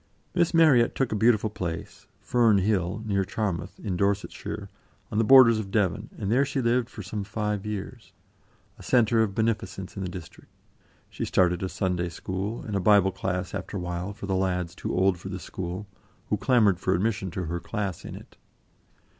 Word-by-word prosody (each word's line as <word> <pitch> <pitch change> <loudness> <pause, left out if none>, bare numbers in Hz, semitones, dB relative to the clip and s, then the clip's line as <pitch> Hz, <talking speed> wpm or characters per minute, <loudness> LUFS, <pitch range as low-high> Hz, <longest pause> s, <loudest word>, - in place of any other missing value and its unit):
Miss 175 -2 +2
Marryat 155 -9 +5
took 135 -3 0
a - - 0
beautiful 110 0 +3
place, 85 -7 -6
Fern 115 -4 +3
Hill, 95 0 0
near 100 -2 +1
Charmouth, 95 -2 -3
in 100 -5 -3
Dorsetshire, 100 +1 -2 0.4
on 105 - 0
the - - +4
borders 115 -2 +8
of 100 -3 -5
Devon, 100 +1 0
and 100 -2 -2
there 130 +4 +4
she 140 0 -2
lived 120 0 +1
for - - -8
some 105 -2 -4
five 105 0 -3
years, 105 -2 -6 0.7
a - - -11
centre 115 -2 +3
of 100 -3 0
beneficence 110 -4 -2
in 100 - -5
the 95 - -3
district. 90 -2 -10 0.6
She - - -5
started 90 -1 +2
a 95 - -2
Sunday 90 -2 -1
School, 95 +6 -4
and 105 - -4
a - - +2
Bible 95 0 +5
Class 90 -1 -3
after 100 +1 -4
awhile 90 +1 -4
for 100 0 -8
the 95 - -1
lads 90 -2 -1
too - - -5
old 95 -1 +2
for 95 - -7
the 95 - -4
school, 90 +2 -5 0.4
who - - +2
clamoured 105 -8 +3
for 95 0 +1
admission 100 0 -1
to 90 +1 -4
her 85 +2 -3
class 100 -2 -4
in - - -7
it. - - -14
100 Hz, 190 wpm, -26 LUFS, 95-110 Hz, 0.7 s, borders